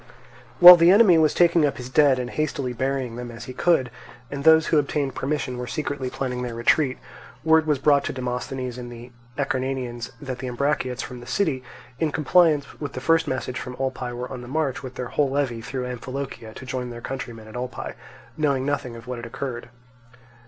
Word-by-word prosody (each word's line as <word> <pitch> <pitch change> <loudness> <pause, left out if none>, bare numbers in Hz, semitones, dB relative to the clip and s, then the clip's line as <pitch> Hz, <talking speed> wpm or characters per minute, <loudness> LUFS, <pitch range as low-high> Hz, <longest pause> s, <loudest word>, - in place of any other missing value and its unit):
While 180 0 +12
the 170 +1 +5
enemy 195 -4 +6
was 155 -2 +4
taking 170 -2 +4
up 145 -2 +1
his 125 - -7
dead 135 0 +4
and 125 -1 -4
hastily 140 -4 -2
burying 130 -1 -2
them 125 0 -6
as 120 0 -9
he 130 - -8
could, 130 -4 +2 0.4
and 140 0 -4
those 160 0 +6
who 155 - +3
obtained 140 -1 -1
permission 135 -3 -3
were 125 - -5
secretly 140 -1 -3
planning 125 -1 -3
their 120 -2 -4
retreat, 130 +3 +2 0.5
word 160 0 +4
was 150 -2 +2
brought 140 +1 +3
to - - -2
Demosthenes 125 0 -4
and 120 -1 -8
the 120 +1 -11 0.3
Acarnanians 130 -3 -2
that 130 -4 -6
the 130 - -5
Ambraciots 130 0 -1
from 125 -1 -8
the 120 - -12
city, 130 -6 0 0.4
in 160 -2 +1
compliance 155 0 +2
with 145 -2 -5
the - - -4
first 165 +3 +2
message 130 -2 -3
from 125 -1 -7
Olpae, 130 -2 -3
were 125 +1 -5
on 125 - -6
the 120 - -10
march 140 -1 -1
with 130 -2 -8
their 125 -1 -5
whole 145 -2 +1
levy 135 -4 -1
through 125 +2 -4
Amphilochia 125 -2 -6
to 130 - -9
join 125 -1 -4
their 120 -1 -8
countrymen 120 -5 -6
at 110 - -12
Olpae, 125 0 -5 0.4
knowing 140 -4 0
nothing 145 -4 -2
of 115 +1 -11
what 125 -1 -5
had 115 - -7
occurred. 120 -1 -6
130 Hz, 200 wpm, -24 LUFS, 125-145 Hz, 0.5 s, While